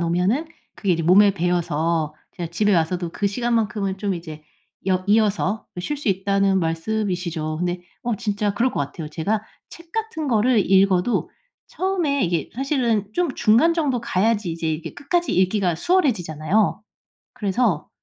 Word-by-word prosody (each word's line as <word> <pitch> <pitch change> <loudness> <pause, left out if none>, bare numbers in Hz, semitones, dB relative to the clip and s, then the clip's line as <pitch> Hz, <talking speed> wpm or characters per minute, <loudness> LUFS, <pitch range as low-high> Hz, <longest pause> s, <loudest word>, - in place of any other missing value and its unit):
놓으면은 180 - +1 0.3
그게 195 -4 0
이제 165 - 0
몸에 200 +3 +6
배어서 165 -3 0 0.2
제가 170 -2 -4
집에 205 +3 +2
와서도 170 +1 0
그 200 - -1
시간만큼은 210 -3 -1
좀 200 -1 -1
이제 160 -3 -8 0.5
여 185 0 +1
이어서 210 0 +2 0.2
쉴 295 +11 -3
수 280 - -3
있다는 195 0 +2
말씀이시죠. 170 -2 -2
근데 180 0 -2 0.2
어 235 -2 -1
진짜 205 -1 -1
그럴 240 +5 +1
것 - - -2
같아요. 150 +2 -5
제가 200 +8 -1 0.3
책 335 0 -14
같은 440 -9 -3
거를 240 -1 +3
읽어도 195 +3 +3 0.4
처음에 345 - 0
이게 170 -3 -1
사실은 245 -6 0
좀 350 -6 0
중간 240 +9 +4
정도 290 -7 0
가야지 210 -3 0
이제 165 0 -3
이게 155 +1 -4
끝까지 345 +5 -1
읽기가 185 -2 +2
수월해지잖아요. 200 - +1 0.5
그래서 205 -6 0
200 Hz, 335 characters per minute, -22 LUFS, 175-235 Hz, 0.5 s, 몸에